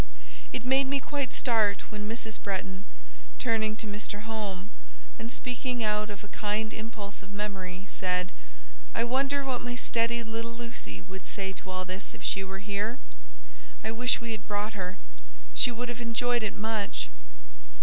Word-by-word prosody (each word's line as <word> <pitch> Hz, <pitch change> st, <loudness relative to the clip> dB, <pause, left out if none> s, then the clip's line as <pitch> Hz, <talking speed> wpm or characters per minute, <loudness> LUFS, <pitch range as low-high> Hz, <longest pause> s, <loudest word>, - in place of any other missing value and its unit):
It 245 Hz, -, -1 dB
made 265 Hz, +1 st, +6 dB
me 280 Hz, +1 st, +3 dB
quite 280 Hz, -2 st, 0 dB
start 220 Hz, -5 st, +3 dB
when 210 Hz, 0 st, -2 dB
Mrs. 225 Hz, -1 st, -3 dB
Bretton, 190 Hz, 0 st, -2 dB, 0.5 s
turning 220 Hz, -3 st, +3 dB
to 225 Hz, -, -4 dB
Mr. 205 Hz, 0 st, -2 dB
Home, 210 Hz, -3 st, -3 dB, 0.5 s
and 230 Hz, +1 st, -3 dB
speaking 250 Hz, -1 st, -1 dB
out 210 Hz, 0 st, +3 dB
of 205 Hz, -1 st, -5 dB
a -, -, -7 dB
kind 215 Hz, +2 st, 0 dB
impulse 215 Hz, -3 st, -5 dB
of 195 Hz, +1 st, -10 dB
memory, 195 Hz, -2 st, -2 dB
said,—"I 60 Hz, -, -2 dB
wonder 275 Hz, +3 st, +3 dB
what 255 Hz, -2 st, +1 dB
my 245 Hz, 0 st, -1 dB
steady 235 Hz, -1 st, +2 dB
little 230 Hz, +1 st, -2 dB
Lucy 235 Hz, -, -4 dB
would 190 Hz, -, -8 dB
say 190 Hz, -1 st, -1 dB
to 190 Hz, -, -7 dB
all 185 Hz, 0 st, -1 dB
this 185 Hz, +3 st, -4 dB
if -, -, -10 dB
she 195 Hz, -, +3 dB
were 195 Hz, +1 st, -5 dB
here? 210 Hz, +4 st, +1 dB, 0.9 s
I 220 Hz, -, +1 dB
wish 245 Hz, +2 st, +4 dB
we 235 Hz, -1 st, -3 dB
had 215 Hz, -2 st, -3 dB
brought 210 Hz, +1 st, +1 dB
her, 185 Hz, -2 st, -2 dB, 0.6 s
she -, -, +7 dB
would 245 Hz, +1 st, -2 dB
have 240 Hz, 0 st, -3 dB
enjoyed 240 Hz, +1 st, +3 dB
it 215 Hz, -2 st, 0 dB
much." 205 Hz, -, 0 dB
215 Hz, 165 wpm, -31 LUFS, 195-235 Hz, 0.9 s, she